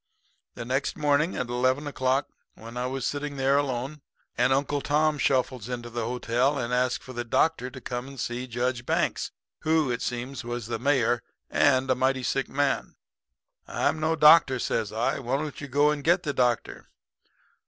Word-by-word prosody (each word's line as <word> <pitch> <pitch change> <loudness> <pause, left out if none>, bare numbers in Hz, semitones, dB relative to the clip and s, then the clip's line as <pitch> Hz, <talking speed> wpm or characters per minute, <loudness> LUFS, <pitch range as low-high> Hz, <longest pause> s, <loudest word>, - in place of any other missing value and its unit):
"The 120 - -6
next 130 +3 -1
morning 150 +4 +2
at 125 - -2
eleven 130 +4 +1
o'clock 135 -1 0 0.3
when 115 +2 -11
I 125 +1 -1
was 130 0 -3
sitting 145 0 -3
there 135 +1 +2
alone, 135 +1 -3 0.3
an 125 +2 +2
Uncle 140 +1 +1
Tom 150 +1 +1
shuffles 130 -4 0
into 120 -1 -5
the 115 -1 -2
hotel 125 +3 0
and 125 -2 -2
asked 125 0 +1
for 130 - -10
the 120 0 -3
doctor 125 +2 +1
to 130 - -10
come 125 +1 -5
and 135 -1 -10
see 120 +2 -3
Judge 120 0 -2
Banks, - - 0 0.3
who, 155 -4 +2
it 120 - -2
seems, 125 +2 -4
was 120 -1 -4
the 115 0 -3
mayor 120 -3 +2 0.3
and 130 -2 +3
a - - +6
mighty 130 +1 0
sick 135 +2 -1
man. 140 0 -1 0.7
"'I'm - - 0
no 160 +1 +1
doctor,' 150 -3 +7
says 110 -3 -1
I. 115 +5 0
'Why 130 0 -1
don't 150 0 -5
you 140 - -5
go 145 +3 +3
and 150 -1 -3
get 175 +3 +3
the 145 -4 -2
doctor?' 120 -3 -1
130 Hz, 185 wpm, -27 LUFS, 120-145 Hz, 0.7 s, doctor